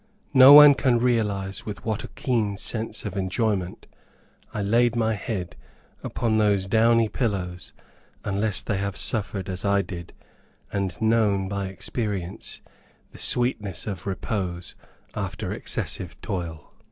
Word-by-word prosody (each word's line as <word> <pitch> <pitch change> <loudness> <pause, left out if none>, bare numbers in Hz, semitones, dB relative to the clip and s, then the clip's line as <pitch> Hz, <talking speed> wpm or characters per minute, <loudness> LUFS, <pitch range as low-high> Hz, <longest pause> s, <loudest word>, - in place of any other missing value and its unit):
No 135 +1 +10
one 150 0 +11
can 130 -3 +2
realize 105 -5 0
with 105 -2 -7
what 110 -1 -2
a - - -6
keen 110 -6 -1
sense 110 0 -4
of 100 -2 -5
enjoyment 95 -1 -1 0.7
I 105 - -3
laid 115 +3 +2
my 110 -1 +1
head 95 -3 -4 0.5
upon 110 -2 0
those 100 -3 +2
downy 115 +2 +3
pillows, 95 -7 -3 0.5
unless 100 +1 0
they 105 - -1
have 100 0 -3
suffered 100 -4 0
as 95 -1 -5
I 100 -1 +2
did, 85 -3 -8 0.6
and 95 -4 -2
known 110 -4 +2
by 100 0 -3
experience 95 -1 -5 0.5
the - - -14
sweetness 105 -7 +1
of 100 -3 -6
repose 95 -3 -3 0.4
after - - -4
excessive - - -4
toil. 85 -6 -5
100 Hz, 130 wpm, -25 LUFS, 95-115 Hz, 0.7 s, one